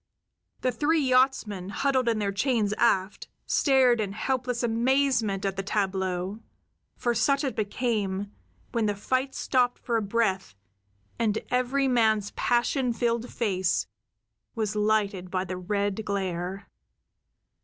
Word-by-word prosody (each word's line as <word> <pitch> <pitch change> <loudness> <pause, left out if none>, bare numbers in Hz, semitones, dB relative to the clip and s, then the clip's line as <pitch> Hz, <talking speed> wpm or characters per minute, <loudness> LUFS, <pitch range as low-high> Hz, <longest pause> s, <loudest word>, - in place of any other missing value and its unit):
The 255 - +1
three 315 +5 +1
yachtsmen, 255 -8 +1
huddled 260 +2 +1
in 225 - +1
their 205 -2 -1
chains 215 -1 +1
aft, 195 -4 +1 0.2
stared 260 -5 +3
in 200 -2 -3
helpless 250 +1 -2
amazement 235 -4 +1
at 195 0 -2
the - - 0
tableau; 190 -1 -2 0.6
for 240 - 0
such 275 +6 +2
it 270 - -2
became, 205 -3 -1 0.4
when 230 -3 0
the 205 - 0
fight 260 +6 -1
stopped 245 -2 +1
for 235 -2 -1
a - - 0
breath 195 - -1 0.6
and 220 -2 +1
every 255 +2 +1
man's 220 -5 +2
passion 245 +1 +1
filled 235 0 -1
face 190 -6 0 0.7
was 215 -2 -2
lighted 210 -3 0
by 185 0 -1
the 185 0 -4
red 200 +3 -1
glare. 190 -1 -3
220 Hz, 130 wpm, -27 LUFS, 195-250 Hz, 0.7 s, stared